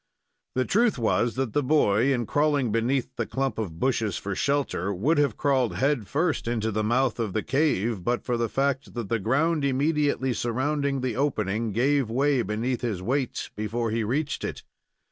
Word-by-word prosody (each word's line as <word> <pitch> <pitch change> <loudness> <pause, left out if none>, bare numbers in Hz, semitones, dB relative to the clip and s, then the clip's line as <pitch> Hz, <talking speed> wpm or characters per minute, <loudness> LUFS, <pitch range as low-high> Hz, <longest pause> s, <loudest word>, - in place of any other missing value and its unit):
The 130 0 +1
truth 230 -1 +2
was 115 0 +1
that 130 -4 -2
the 145 - +2
boy, 130 -4 +3
in 120 -3 0
crawling 145 -3 +1
beneath 120 +4 0
the - - -1
clump 135 -3 -2
of 85 -7 -4
bushes 115 -6 0
for 100 - -4
shelter, 140 -6 0
would 135 - +1
have 140 -7 +1
crawled 130 -5 +1
head 135 -6 0
first 155 -3 0
into 110 -2 -1
the 110 +1 -1
mouth 120 +2 +1
of 110 -5 -2
the 110 - -1
cave, 120 - 0
but 120 +4 0
for 125 - -1
the 115 -1 -1
fact 135 -1 -1
that 115 -5 -4
the 115 - +1
ground 145 - +1
immediately 140 -1 +1
surrounding 135 +4 -1
the 125 -3 -2
opening 110 -5 -1
gave 130 +3 +1
way 135 +2 +2
beneath 115 +4 -2
his 115 -7 -2
weight 130 +3 -2
before 110 +2 -2
he 115 0 0
reached 140 +7 -2
it. - - -5
125 Hz, 185 wpm, -26 LUFS, 110-140 Hz, -, boy